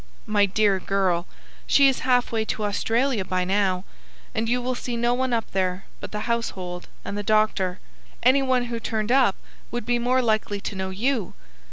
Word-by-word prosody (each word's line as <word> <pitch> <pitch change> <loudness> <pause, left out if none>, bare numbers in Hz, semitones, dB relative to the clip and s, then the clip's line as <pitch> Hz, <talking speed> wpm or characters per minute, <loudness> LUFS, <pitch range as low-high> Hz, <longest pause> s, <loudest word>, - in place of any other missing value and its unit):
"My, 205 -1 +3
dear 200 0 +2
girl, 185 -2 0 0.4
she 280 -1 +6
is 270 - +2
half 250 -1 +2
way 225 -1 +1
to 215 - -3
Australia 225 +3 +1
by 185 0 -1
now, 190 -1 +1 0.5
and 225 0 -1
you 245 +1 +2
will 250 +1 -1
see 245 -1 -4
no 240 +1 +2
one 260 +1 0
up 230 -2 -1
there 185 0 -1
but - - -8
the 210 - -3
household 185 -7 -3 0.2
and 200 - -4
the 205 - -2
doctor. 205 -3 +1 0.4
Any 260 +3 +5
one 260 -2 +2
who 235 -1 -4
turned 220 0 -2
up 255 -7 +4 0.3
would 240 -2 -4
be 240 0 +1
more 250 +2 +2
likely 215 -2 0
to 200 - -5
know 190 0 -3
you. 220 +2 -1
215 Hz, 190 wpm, -24 LUFS, 195-245 Hz, 0.5 s, she